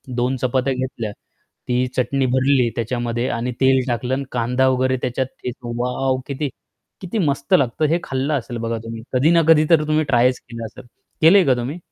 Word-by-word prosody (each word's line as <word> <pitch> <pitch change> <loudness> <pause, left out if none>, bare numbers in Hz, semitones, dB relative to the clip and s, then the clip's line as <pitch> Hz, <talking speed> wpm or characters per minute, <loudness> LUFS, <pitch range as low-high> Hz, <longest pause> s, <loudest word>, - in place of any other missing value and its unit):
2 125 +2 0
चपात्या 130 +1 0
घेतल्या, 125 -4 -4 0.6
ती 125 +1 +1
चटणी 135 +1 0
भरली 130 0 +2
त्याच्यामध्ये 120 +1 -2
आणि 120 +2 -2
तेल 130 0 +4
टाकलं 125 +1 -1
आणि 140 +1 -1
कांदा 125 +2 +1
वगैरे 130 0 +1
त्याच्यात 130 +1 -1 0.2
ठेचा 120 -1 -6
वॉव! 130 +1 0
किती 140 0 -3 0.5
किती 185 +4 -4
मस्त 140 -5 -1
लागतं. 135 +3 +2
हे 165 +3 +2
खाल्लं 135 +3 -2
असेल 120 -3 -3
बघा 115 0 -2
तुम्ही. 115 0 -7
कधी 135 +5 +3
ना 170 - +5
कधी 155 -1 +6
तर 165 -3 +5
तुम्ही 155 0 +2
ट्रायच 125 -1 +2
केलं 115 -2 -8
असेल, 110 - -11 0.4
केलंय 180 +4 +7
का 130 - +4
तुम्ही? 125 +7 -4
130 Hz, 180 wpm, -20 LUFS, 120-140 Hz, 0.6 s, केलंय